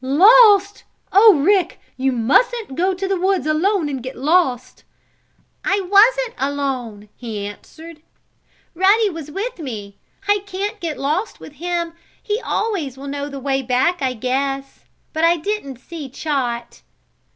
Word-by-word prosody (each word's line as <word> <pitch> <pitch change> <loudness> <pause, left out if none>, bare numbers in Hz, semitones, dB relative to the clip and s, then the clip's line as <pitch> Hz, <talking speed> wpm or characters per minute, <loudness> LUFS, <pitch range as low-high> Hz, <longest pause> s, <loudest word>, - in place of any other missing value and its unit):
"Lost! 405 - +5 0.3
Oh, 410 +2 +7
Rick! 360 +4 +1 0.2
You 265 +1 0
mustn't 290 - +1
go 370 +4 +1
to 385 +1 -3
the 385 -2 -1
woods 380 -1 +1
alone 325 +3 +1
and 270 -3 -4
get 255 +2 -7
lost!" 270 -4 0 0.8
"I 395 +1 +1
wasn't 450 +6 +4
alone," 260 -7 -3
he 220 -4 -6
answered. 315 +10 -11 0.7
"Ruddy 395 +4 +3
was 320 -3 -8
with 410 +8 -5
me. 210 -9 -7 0.3
I 410 0 +3
can't 400 +2 -4
get 330 -5 -4
lost 310 +10 -2
with 300 - -12
him. 340 +2 -3 0.3
He 425 +3 -3
always 335 - -2
will 275 - -9
know 285 +1 -4
the 275 -1 -7
way 270 0 -1
back, 265 +7 0
I 260 -1 0
guess. 270 +3 -3 0.3
But 315 - -2
I 340 +1 +4
didn't 325 - -4
see 300 +1 -9
Chot." 250 -4 -3
315 Hz, 145 wpm, -20 LUFS, 270-390 Hz, 0.8 s, Oh